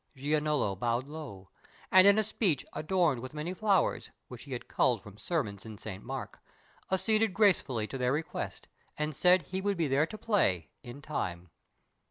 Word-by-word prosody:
Giannolo 150 -6 0
bowed 120 +2 0
low, 140 -12 -9 0.4
And 185 +1 +8
in 200 +1 +7
a 220 - +3
speech 195 - 0
adorned 155 -6 +1
with 130 +4 -8
many 155 +4 -3
flowers, 195 -2 +1 0.2
Which 125 0 -9
he 140 - -7
had 120 - -6
culled 120 -3 +2
from 105 +2 -14
sermons 105 - -2
in 110 -2 -9
Saint 100 -1 -8
Mark, 135 0 -6 0.5
Acceded 215 +1 +2
gracefully 175 - +3
to 135 +4 -6
their 125 0 +1
request, 155 +3 -4 0.3
And 150 -1 -2
said 180 +2 +5
he 185 +6 -4
would 200 -1 0
be 165 -3 +1
there 140 +3 +2
to 215 - -8
play, 140 - +1
in 130 +3 -10
time. 90 - -4
150 Hz, 175 wpm, -30 LUFS, 120-185 Hz, 0.5 s, And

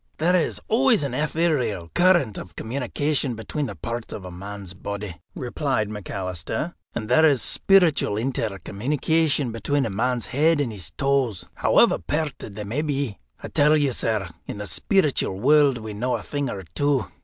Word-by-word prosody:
"There 175 +4 +3
is 170 - +1
always 235 - +3
an 140 -3 -2
etherial 145 - 0
current 175 - +3
of 90 - -10
communication 135 +2 -1
between 135 +6 -3
the 100 - -6
parts 115 +6 -5
of 95 - -7
a 90 - -7
man's 100 +1 -7
body," 100 -3 -6
replied 125 -3 -1
McAlister, 95 - -4 0.2
"and 110 -2 -3
there 160 - +4
is 145 -5 +5
speeritual 170 - +3
intercommunication 135 +6 0
between 135 +5 0
a 110 - -3
man's 125 +4 0
head 155 +4 +2
and 135 -5 0
his 100 -4 -5
toes, 135 -8 +1
however - - +4
pairted 150 -9 -3
they 105 - -5
may 115 +9 -2
be. 140 -7 -2 0.2
I - - -5
tell 150 +2 +4
you, 145 -3 +2
sir, 110 -5 -1 0.2
in - - -5
the 105 - -5
speeritual 145 - +1
world 145 +1 +5
we 110 -2 -6
know 125 +5 -1
a - - -5
thing 145 -2 -2
or 95 -4 -5
two." 130 - 0
125 Hz, 165 wpm, -24 LUFS, 105-150 Hz, 0.2 s, is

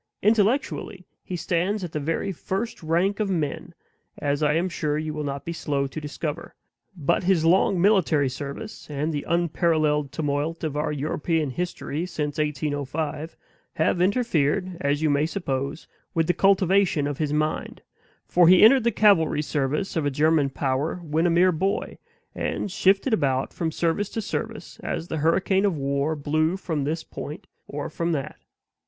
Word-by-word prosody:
Intellectually 210 -3 +1 0.2
he 185 - -5
stands 180 +4 -1
in 175 - -5
the 155 - -2
very 165 +6 -1
first 195 +6 -4
rank 175 +6 +1
of 210 -2 0
men, 160 -6 -2 0.4
as 145 +1 -1
I 150 -1 +3
am 170 +3 +1
sure 150 -4 -1
you 155 0 -3
will 150 0 -3
not 140 -1 -4
be 170 - -3
slow 140 -4 -1
to 140 +3 -6
discover; 150 +2 -5 0.4
but 155 +3 +1
his 180 -4 +3
long 180 +2 +4
military 175 -7 +3
service, 140 - -7
and 150 +2 -2
the 145 - -2
unparalleled 155 -4 +1
tumult 150 +2 -2
of 155 -3 -2
our 150 +1 -1
European 150 +1 -1
history 175 0 -3
since 150 -4 -3
1805, 150 +1 -2 0.4
have 175 - +1
interfered 185 - +1
(as 145 0 0
you 155 - +3
may 145 +2 +2
suppose) 140 -4 -3 0.3
with 165 -1 +2
the 175 - +2
cultivation 195 -5 +3
of 145 -1 -3
his 150 -2 0
mind; 155 +1 -2 0.4
for 175 -1 +5
he 185 +2 +7
entered 240 +2 +7
the 235 - +4
cavalry 165 -8 +4
service 150 +5 -1
of 160 - +1
a 145 - +1
German 150 0 +2
power 135 +3 -1
when 160 +2 +1
a - - +3
mere 175 +2 +4
boy, 190 +4 -2 0.3
and 200 - -3
shifted 195 +6 +2
about 135 -9 +1
from 165 -2 -2
service 170 +5 0
to - - -4
service 225 +1 -5
as 165 - -4
the 160 - -2
hurricane 185 +5 +2
of 195 -6 +1
war 140 +2 0
blew 155 +4 0
from 160 -7 -2
this 160 +2 -2
point 165 +7 -8 0.2
or 145 0 -4
from 170 0 -2
that. 140 -3 -4
160 Hz, 170 wpm, -25 LUFS, 145-185 Hz, 0.4 s, he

